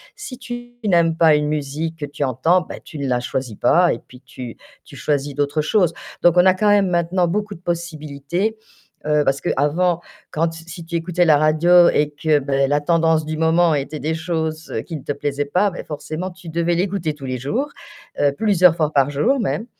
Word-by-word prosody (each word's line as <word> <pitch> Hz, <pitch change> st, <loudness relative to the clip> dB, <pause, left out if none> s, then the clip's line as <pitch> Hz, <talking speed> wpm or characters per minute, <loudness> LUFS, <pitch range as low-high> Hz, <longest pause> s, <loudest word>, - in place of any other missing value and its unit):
si 360 Hz, -12 st, -8 dB
tu 240 Hz, -1 st, -8 dB
n'aimes 170 Hz, -4 st, +3 dB
pas 160 Hz, -2 st, +5 dB
une 150 Hz, 0 st, 0 dB
musique 150 Hz, +2 st, -3 dB
que 145 Hz, -, -3 dB
tu 145 Hz, 0 st, -5 dB
entends, 160 Hz, +8 st, +2 dB
ben -, -, -9 dB
tu 155 Hz, -, -10 dB
ne 140 Hz, -, -2 dB
la 125 Hz, -1 st, +1 dB
choisis 125 Hz, -2 st, -4 dB
pas 175 Hz, 0 st, +4 dB
et 115 Hz, -, -6 dB
puis 125 Hz, 0 st, -17 dB
tu 130 Hz, -3 st, -9 dB, 0.3 s
tu -, -, -14 dB
choisis 145 Hz, -1 st, -2 dB
d'autres 145 Hz, +2 st, 0 dB
choses. 175 Hz, +1 st, +2 dB, 0.3 s
Donc 175 Hz, 0 st, +4 dB
on 180 Hz, -, +6 dB
a 185 Hz, -, +6 dB
quand 210 Hz, +3 st, 0 dB
même 205 Hz, -1 st, +4 dB
maintenant 175 Hz, +1 st, +1 dB
beaucoup 205 Hz, +3 st, -2 dB
de -, -, -14 dB
possibilités, 170 Hz, +3 st, -3 dB, 0.5 s
heu, 150 Hz, -1 st, +2 dB
parce 135 Hz, 0 st, +1 dB
qu'avant 165 Hz, +5 st, +1 dB, 0.3 s
quand 165 Hz, +1 st, 0 dB
si 165 Hz, +1 st, -10 dB
tu 170 Hz, -, -6 dB
écoutais 175 Hz, +1 st, +1 dB
la 155 Hz, -3 st, +5 dB
radio 170 Hz, +4 st, +5 dB
et 150 Hz, 0 st, +1 dB
que 155 Hz, -2 st, +3 dB
ben 135 Hz, -1 st, 0 dB
la 145 Hz, +1 st, +2 dB
tendance 160 Hz, 0 st, +2 dB
du 155 Hz, 0 st, -4 dB
moment 165 Hz, +1 st, +3 dB
était 145 Hz, +1 st, -3 dB
des 155 Hz, +2 st, -2 dB
choses 160 Hz, -1 st, -3 dB
qui 165 Hz, -, -6 dB
ne -, -, -10 dB
te -, -, -3 dB
plaisaient 145 Hz, 0 st, -2 dB
pas, 185 Hz, +8 st, +1 dB
ben 175 Hz, -, -7 dB
forcément 155 Hz, +4 st, -5 dB
tu 180 Hz, -1 st, -12 dB
devais 170 Hz, +1 st, 0 dB
l'écouter 180 Hz, -3 st, -1 dB
tous 145 Hz, -2 st, -10 dB
les 130 Hz, -1 st, -3 dB
jours, 230 Hz, -, -2 dB, 0.5 s
heu, 145 Hz, -, +3 dB
plusieurs 185 Hz, -6 st, +4 dB
fois 155 Hz, -3 st, 0 dB
par 140 Hz, -1 st, +3 dB
jour 230 Hz, -, +1 dB
même, 225 Hz, +1 st, -2 dB
160 Hz, 210 wpm, -20 LUFS, 145-175 Hz, 0.5 s, on